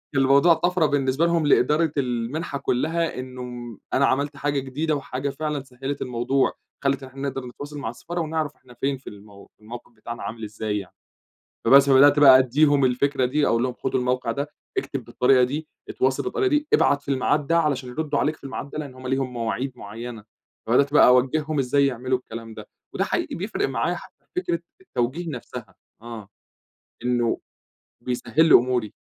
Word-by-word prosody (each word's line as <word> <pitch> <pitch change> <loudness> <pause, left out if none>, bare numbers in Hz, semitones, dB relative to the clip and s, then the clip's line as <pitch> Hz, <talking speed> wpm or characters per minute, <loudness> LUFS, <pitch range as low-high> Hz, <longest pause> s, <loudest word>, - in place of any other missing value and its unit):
الموضوع 140 +5 +5
طفرة 175 0 +1
بالنسبة 140 +2 +1
لهم 170 -3 +1
لإدارة 150 +4 +3
المنحة 130 +4 -2
كلّها، 155 +3 -1
إنّه 125 -3 -7 0.2
أنا 140 - +4
عملت 140 +2 0
حاجة 145 -1 0
جديدة 145 +4 -2
وحاجة 140 0 -3
فعلًا 150 0 -3
سهلت 135 +2 -6
الموضوع، 125 +2 0 0.3
خلت 140 0 +1
إن 130 - -9
إحنا 135 +1 -4
نقدر 135 -1 -6
نتواصل 145 +4 -8
مع 110 - -3
السفارة 170 +8 -5
ونعرف 155 -2 -2
إحنا 125 -1 -18
فين 135 0 0
في 130 - -22
المو 100 -1 -14
في - - -37
الموقف 120 +2 -10
بتاعنا 115 0 -8
عامل 110 +2 -6
إزاي 105 -1 -3
يعني. 95 - -11 0.7
فبَس، 140 +1 +7
فبدأت 145 +2 +6
بقى 135 -2 +9
أديهم 140 +2 +3
الفكرة 130 +1 +1
دي، 145 +3 +1
أقول 115 +1 +2
لهم 125 -1 -1
خدوا 130 +1 -2
الموقع 125 -1 0
ده، 140 +4 -4 0.3
اكتب 135 -3 -3
بالطريقة 125 +2 +3
دي، 150 +5 -2 0.2
اتواصل 130 +1 0
بالطريقة 390 -2 0
دي، 300 -1 +1
ابعت 140 0 +4
في 140 - -3
الميعاد 140 +2 +1
ده 165 0 +3
علشان 135 -5 -1
يردوا 150 +3 -2
عليك 155 +1 +1
في - - -28
الميعاد 140 +1 -6
ده، - - -7
لأن 140 -4 -7
هُم 130 0 -8
ليهم 130 -1 -1
مواعيد 120 +3 -2
معيّنة، 115 +1 -8 0.4
فبدأت 140 +5 +3
بقى - - +7
أوجههم 140 +4 +2
إزاي 140 +2 +3
يعملوا 130 0 -1
الكلام 115 -2 -9
ده، - - -11 0.2
وده - - 0
حقيقي - - -2
بيفرق 220 - -2
معايا - - -1
حتّى - - -13
فكرة 175 - -1 0.2
التوجيه 165 - -3
نفسها، 120 -6 -8 0.3
آه، 115 -4 -9 0.8
إنّه 120 -2 +1 0.7
بيسهل 130 +6 +1
لي - - +6
أموري. 125 -3 +2
135 Hz, 180 wpm, -24 LUFS, 125-145 Hz, 0.8 s, بقى